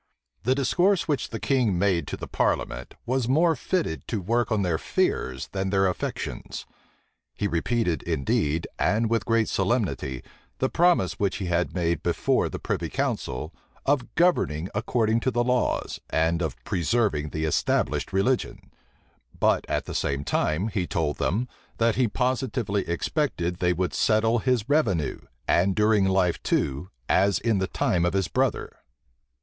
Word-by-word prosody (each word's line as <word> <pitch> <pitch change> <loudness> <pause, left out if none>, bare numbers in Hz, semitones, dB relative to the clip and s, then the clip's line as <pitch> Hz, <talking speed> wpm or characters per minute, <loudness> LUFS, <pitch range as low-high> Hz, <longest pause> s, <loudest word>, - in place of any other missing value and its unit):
The 130 +3 +2
discourse 170 +6 +2
which 145 -3 -1
the 115 - -5
king 125 -9 +1
made 90 -2 +1
to - - -4
the - - -6
parliament - - -1
was 125 -1 0
more 160 +4 +4
fitted 145 - -2
to 110 - -2
work 115 +5 0
on 105 -2 +2
their 85 -3 0
fears 65 0 -1
than 95 0 -2
their 95 0 +3
affections. 90 - -4 0.7
He 105 - -1
repeated, 90 0 0
indeed, 75 +4 0
and 110 +2 +1
with 115 -3 0
great 115 -1 +2
solemnity, 95 - -1 0.3
the 130 - 0
promise 170 - +2
which 100 -2 +1
he 100 - -4
had 90 +1 0
made 85 -3 0
before - - +1
the - - -5
privy - - -3
council, 75 +6 -2 0.3
of 135 -3 0
governing 95 - +2
according 110 +1 +1
to 130 - 0
the 120 -1 +1
laws, 125 0 0
and 80 +1 +1
of 80 -6 -2
preserving 85 - 0
the 80 +1 -2
established 80 - 0
religion: 100 +7 -1 0.7
but - - +2
at - - -1
the - - -6
same 70 0 -1
time, 75 +8 0
he 95 -5 -2
told 75 -2 -1
them, 115 +7 0 0.3
that 115 0 +3
he 125 -2 +3
positively 115 -6 -1
expected 90 - -1
they 90 -1 +2
would 90 +1 -1
settle 110 +2 +2
his 125 -2 0
revenue, 110 - +1 0.3
and 95 +2 +3
during 105 -2 +3
life 95 -2 +2
too, 70 +7 -1 0.2
as 100 -1 +3
in 110 -4 +1
the 95 - 0
time 85 -2 0
of 85 0 +1
his 95 -2 +1
brother. - - -1
100 Hz, 155 wpm, -26 LUFS, 85-120 Hz, 0.7 s, more